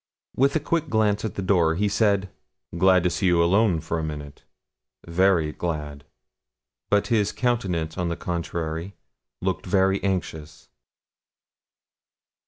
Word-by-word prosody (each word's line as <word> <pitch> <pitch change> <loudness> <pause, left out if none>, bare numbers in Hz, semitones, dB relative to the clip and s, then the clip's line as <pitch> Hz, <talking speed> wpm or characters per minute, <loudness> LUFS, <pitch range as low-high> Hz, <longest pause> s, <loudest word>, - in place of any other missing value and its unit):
With 140 +3 +2
a - - +3
quick 160 +2 -1
glance 105 -2 +1
at 110 - -4
the 100 - -3
door, 85 -4 +2
he 105 +4 +1
said 100 -2 +1 0.4
'Glad 95 0 +4
to 90 - +1
see 95 +3 0
you 85 -1 +4
alone 95 0 +3
for 80 - -3
a - - -3
minute 75 -2 -7 0.6
very 85 -2 +2
glad.' 75 -4 -5 0.8
But 100 +2 +2
his 105 -3 +2
countenance, 95 -10 -1
on 90 -1 -1
the 85 - -3
contrary, 85 +1 -4 0.5
looked 95 0 -2
very 95 +1 +2
anxious. 80 -6 -4
90 Hz, 135 wpm, -24 LUFS, 80-100 Hz, 0.8 s, Glad